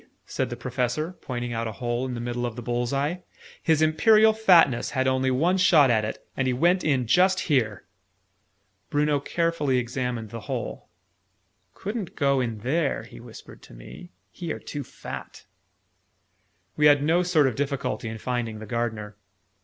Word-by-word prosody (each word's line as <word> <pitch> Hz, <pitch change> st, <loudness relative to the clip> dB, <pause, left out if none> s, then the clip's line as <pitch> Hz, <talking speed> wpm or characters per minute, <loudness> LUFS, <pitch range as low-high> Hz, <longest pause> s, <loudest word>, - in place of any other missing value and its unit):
said 130 Hz, -2 st, -2 dB
the 120 Hz, -, -4 dB
Professor, 125 Hz, +6 st, -2 dB
pointing 120 Hz, -2 st, -4 dB
out 115 Hz, 0 st, -2 dB
a 110 Hz, -, -5 dB
hole 120 Hz, +4 st, -2 dB
in 125 Hz, -, -4 dB
the -, -, -5 dB
middle 120 Hz, +1 st, -3 dB
of 120 Hz, -2 st, -3 dB
the 125 Hz, -, -6 dB
bull's 120 Hz, 0 st, -1 dB
eye. 145 Hz, +6 st, -1 dB, 0.4 s
"His 160 Hz, -1 st, +2 dB
Imperial 215 Hz, +8 st, +5 dB
Fatness 175 Hz, -, +4 dB
had 130 Hz, 0 st, +2 dB
only 130 Hz, 0 st, +1 dB
one 165 Hz, +9 st, +2 dB
shot 155 Hz, -8 st, +5 dB
at 110 Hz, -2 st, +2 dB
it; 105 Hz, -, -5 dB
and 135 Hz, -, 0 dB
he 130 Hz, -, +1 dB
went 175 Hz, +8 st, +2 dB
in 135 Hz, -5 st, +1 dB
just 185 Hz, -, +3 dB
here!" 115 Hz, -, 0 dB, 1.0 s
Bruno 145 Hz, 0 st, +1 dB
carefully 150 Hz, -3 st, 0 dB
examined 120 Hz, -2 st, -3 dB
the 115 Hz, -, -6 dB
hole. -, -, -5 dB, 0.9 s
"Couldn't 205 Hz, -2 st, -5 dB
go 140 Hz, -2 st, +2 dB
in 115 Hz, -4 st, -3 dB
there," 140 Hz, +5 st, 0 dB
he -, -, -13 dB
whispered -, -, -13 dB
to -, -, -15 dB
me. 60 Hz, +7 st, -12 dB, 0.2 s
"He 170 Hz, -, -6 dB
are -, -, -3 dB
too 145 Hz, -1 st, -6 dB
fat!" -, -, -9 dB, 1.3 s
We 150 Hz, 0 st, +5 dB
had 145 Hz, -1 st, +5 dB
no 165 Hz, +4 st, +3 dB
sort 175 Hz, -5 st, +3 dB
of 130 Hz, -, +1 dB
difficulty 140 Hz, -3 st, -3 dB
in 110 Hz, -, -6 dB
finding 115 Hz, -1 st, -3 dB
the 110 Hz, -, -8 dB
Gardener. 110 Hz, -3 st, -3 dB
130 Hz, 170 wpm, -25 LUFS, 120-155 Hz, 1.3 s, Imperial